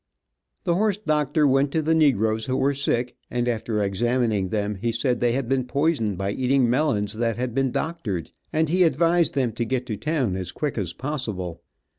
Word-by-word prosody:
The 175 -5 +1
horse 205 +2 +1
doctor 150 -5 +1
went 135 +1 +3
to 160 - +2
the 160 +2 +2
negroes 110 -8 +2
who 130 0 0
were 140 +2 +2
sick, 125 -3 -1
and 120 0 -1
after 110 -2 -1
examining 110 -1 0
them 105 0 -1
he 115 +4 -1
said 120 +2 0
they 120 -1 +2
had 130 -1 -1
been 135 0 +1
poisoned 125 - 0
by 100 +1 -1
eating 130 +2 +2
melons 115 -6 +1
that 115 0 -1
had 125 -1 -2
been 135 +1 +1
doctored, 120 - -3 0.2
and 160 +1 +1
he 180 +4 +1
advised 165 -1 +3
them 130 -4 +1
to 115 +2 -2
get 125 +2 -2
to 110 -4 -4
town 140 - -1
as 95 -2 -4
quick 145 +7 -3
as 90 -4 -3
possible. 110 - -4
125 Hz, 195 wpm, -24 LUFS, 110-150 Hz, 0.2 s, went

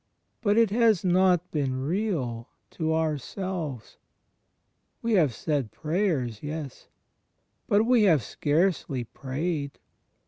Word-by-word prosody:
But 205 -1 +2
it 230 -3 +4
has 220 -4 +3
not 180 -1 +3
been 130 -4 -1
real 145 - -2 0.2
to 160 -1 -2
ourselves. 160 - -3 1.1
We 230 0 +1
have 165 -9 +4
said 135 -1 -2
prayers? 150 - -1
Yes. 150 -3 -6 0.8
But 205 +2 +4
we 245 -1 +4
have 155 -8 +3
scarcely 150 - 0
prayed. 140 +4 -4
160 Hz, 105 wpm, -27 LUFS, 135-190 Hz, 1.1 s, it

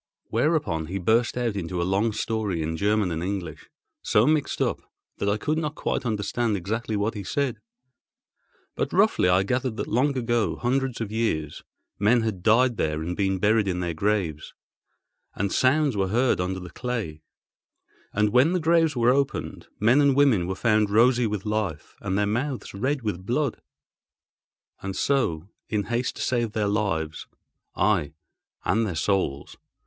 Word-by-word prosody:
Whereupon 115 - 0
he 95 +4 -3
burst 115 +7 +1
out 120 -4 -1
into 90 -2 -3
a - - +1
long 100 +5 +1
story 105 -6 -2
in 80 +1 -2
German 100 +1 +1
and 80 0 -3
English, 90 -5 -5 0.3
so 105 +2 +3
mixed 150 -1 +1
up - - 0 0.4
that 100 - 0
I 100 - +1
could 155 +8 -1
not 155 -1 -3
quite 125 - -2
understand 110 +1 -1
exactly 110 +4 -3
what 105 +2 0
he 105 -3 -6
said, 140 +5 -1 1.1
but - - -2
roughly 90 - +3
I 90 +1 +4
gathered 125 +1 -1
that - - -2
long 135 +5 +1
ago, 120 -2 0
hundreds 130 0 -1
of 110 -2 -3
years, 80 -10 -1 0.4
men 115 +4 +4
had 110 -5 -2
died 120 +3 +3
there 75 0 -1
and 90 +2 -3
been 95 -1 0
buried 105 +2 +2
in 90 -1 -1
their 85 -1 -2
graves; 85 -3 -1 0.8
and 100 0 -1
sounds 140 0 +3
were 95 -1 +1
heard 120 0 +2
under 95 +1 -2
the 90 -1 -9
clay, 115 -12 -4 0.9
and 105 +1 +2
when 130 - +4
the 180 - +1
graves 165 -2 +3
were 120 0 +4
opened, 140 0 -2
men 120 +7 +4
and 140 -2 +4
women 130 -11 +3
were 95 - -2
found 110 0 +2
rosy 120 +3 +4
with 105 -2 -4
life, 105 -8 -3
and 95 -1 -1
their 105 - +2
mouths 125 +6 -2
red 130 +6 -1
with 100 -4 -3
blood. 125 +5 -1 1.2
And 95 -1 -4
so, 95 - 0 0.2
in 105 -2 0
haste 120 +3 -2
to - - -4
save 120 -4 0
their 105 -2 0
lives 95 -7 -1 0.5
(aye, 90 -8 +1 0.5
and 110 +3 +2
their 90 - -4
souls! 75 -4 -1
105 Hz, 170 wpm, -25 LUFS, 95-125 Hz, 1.2 s, I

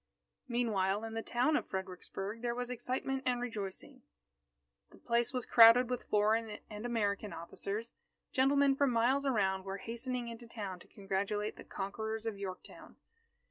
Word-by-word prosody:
Meanwhile, 215 -5 +1
in 225 0 -5
the 225 - -2
town 250 +7 +1
of - - 0
Fredericksburg 190 +3 -5
there 240 -1 -1
was 245 0 -3
excitement 260 +2 -2
and 245 -1 +2
rejoicing. 235 +3 -5 0.9
The - - -17
place 235 +1 +1
was 255 -3 -2
crowded 235 +2 +8
with 250 - -2
foreign 215 +1 +2
and 210 +3 -4
American 210 -3 -1
officers. 200 +7 -5 0.4
Gentlemen 275 +1 +4
from 280 0 +3
miles 255 +4 +2
around 190 -6 +1
were 195 0 -4
hastening 235 +3 -3
into 235 0 -8
town 200 -6 -5
to - - -16
congratulate 200 +2 -2
the - - -10
conquerors 220 +3 -4
of 225 -2 -2
Yorktown. 190 -2 -8
225 Hz, 150 wpm, -34 LUFS, 200-245 Hz, 0.9 s, crowded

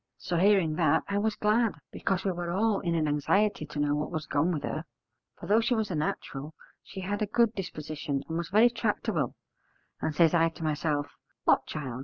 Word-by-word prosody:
So, 175 - -2
hearing 185 -4 +3
that, 160 -1 +3
I 200 0 0
was 215 +1 0
glad, 220 +1 +2 0.2
because 195 0 -1
we 195 - +2
were 175 -1 -4
all 210 +3 +2
in 170 -3 -1
an 155 -2 +1
anxiety 155 +4 +1
to 150 - -8
know 145 0 +2
what 150 +1 -1
was 160 -3 -4
gone 150 +5 +1
with 155 -4 -2
her: 155 - -3 0.5
for - - -9
though 210 +5 +4
she 240 +2 +1
was 220 -3 -1
a - - -1
natural, 150 0 -3 0.3
she 190 - -9
had 205 +3 -3
a 210 - +1
good 230 +1 +3
disposition 155 -6 -4
and 160 - -4
was 170 0 -2
very 220 +5 +5
tractable: 210 - -1 0.7
and 155 - -1
says 165 0 +5
I 165 -1 +4
to 165 0 -10
myself, 150 -1 0 0.4
'What, - - +3
child! 130 -5 -5
170 Hz, 210 wpm, -29 LUFS, 155-205 Hz, 0.7 s, very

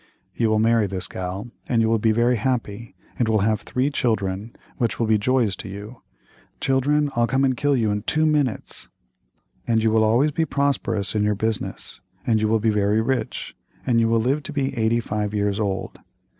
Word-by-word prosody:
You 115 -2 +1
will 110 - +2
marry 115 -1 +3
this 95 -2 -4
gal 95 +6 -6 0.2
and 120 - +2
you 115 - +3
will 115 0 +2
be 110 +1 +3
very 120 +2 +2
happy, 115 -2 -3 0.2
and 120 -2 +2
will 110 -2 +2
have 110 +1 +1
three 130 +3 -1
children, 105 -4 -1 0.2
which 120 -2 -1
will 115 - +2
be 110 -1 +3
joys 115 -3 +1
to - - -7
you. 105 +5 -9 0.6
Children, 145 +2 +1
I'll 120 0 +2
come 135 +2 +1
and 130 -1 +1
kill 145 +3 +1
you 110 -3 +1
in 105 0 -1
two 155 +8 +1
minutes. 145 -7 -1 0.8
And 115 -1 +2
you 110 - +3
will 110 0 +3
always 120 +8 +3
be 160 - 0
prosperous 140 -8 -1
in 105 -1 +1
your 105 0 +1
business, 110 +1 -4 0.2
and 110 -2 +2
you 110 - +2
will 110 +1 +2
be 110 +1 +2
very 105 +1 +2
rich, 125 +3 -2 0.3
and 120 -3 +3
you 115 -1 +2
will 115 0 +3
live 135 +6 +1
to 150 - -7
be 135 -2 -2
eighty 115 0 +1
five 105 -1 -3
years 100 0 0
old. 100 -2 -3
115 Hz, 205 wpm, -23 LUFS, 105-125 Hz, 0.8 s, marry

